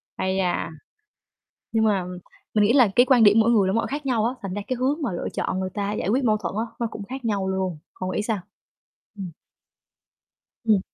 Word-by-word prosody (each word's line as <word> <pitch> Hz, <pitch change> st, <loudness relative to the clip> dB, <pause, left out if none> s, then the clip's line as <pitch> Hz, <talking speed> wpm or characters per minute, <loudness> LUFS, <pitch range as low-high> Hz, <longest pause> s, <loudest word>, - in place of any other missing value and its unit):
Ây 190 Hz, 0 st, -1 dB
da, 180 Hz, -2 st, 0 dB, 1.0 s
nhưng 225 Hz, -1 st, +2 dB
mà 200 Hz, -4 st, +2 dB, 0.5 s
mình 210 Hz, -, +4 dB
nghĩ 210 Hz, +3 st, +4 dB
là 255 Hz, -4 st, +6 dB
cái 245 Hz, -, +6 dB
quan 250 Hz, -3 st, +5 dB
điểm 210 Hz, +1 st, +7 dB
mỗi 225 Hz, +1 st, +4 dB
người 205 Hz, -5 st, +4 dB
là 190 Hz, -, +1 dB
mỗi 230 Hz, -, +1 dB
khác 290 Hz, +1 st, -4 dB
nhau 235 Hz, -5 st, +1 dB
á, 240 Hz, -, 0 dB
thành 195 Hz, -3 st, -4 dB
ra 205 Hz, -, -3 dB
cái 255 Hz, -, -1 dB
hướng 275 Hz, +6 st, 0 dB
mà 265 Hz, -, -1 dB
lựa 175 Hz, -, -3 dB
chọn 185 Hz, -, -1 dB
người 185 Hz, 0 st, -2 dB
ta 205 Hz, 0 st, -2 dB
giải 210 Hz, -, -2 dB
quyết 255 Hz, +5 st, +2 dB
mâu 215 Hz, -3 st, +3 dB
thuẫn 195 Hz, -4 st, -4 dB
á 225 Hz, -, 0 dB
nó 235 Hz, -, 0 dB
cũng 210 Hz, -, -6 dB
khác 260 Hz, +2 st, -7 dB
nhau 200 Hz, -4 st, 0 dB
luôn. 190 Hz, -3 st, -1 dB, 0.2 s
Cậu 185 Hz, 0 st, -2 dB
nghĩ -, -, 0 dB
sao? 215 Hz, -1 st, -1 dB, 0.8 s
Ừm. 190 Hz, -3 st, -5 dB, 1.3 s
Ừm. 215 Hz, -4 st, +4 dB
215 Hz, 225 wpm, -24 LUFS, 190-240 Hz, 1.3 s, điểm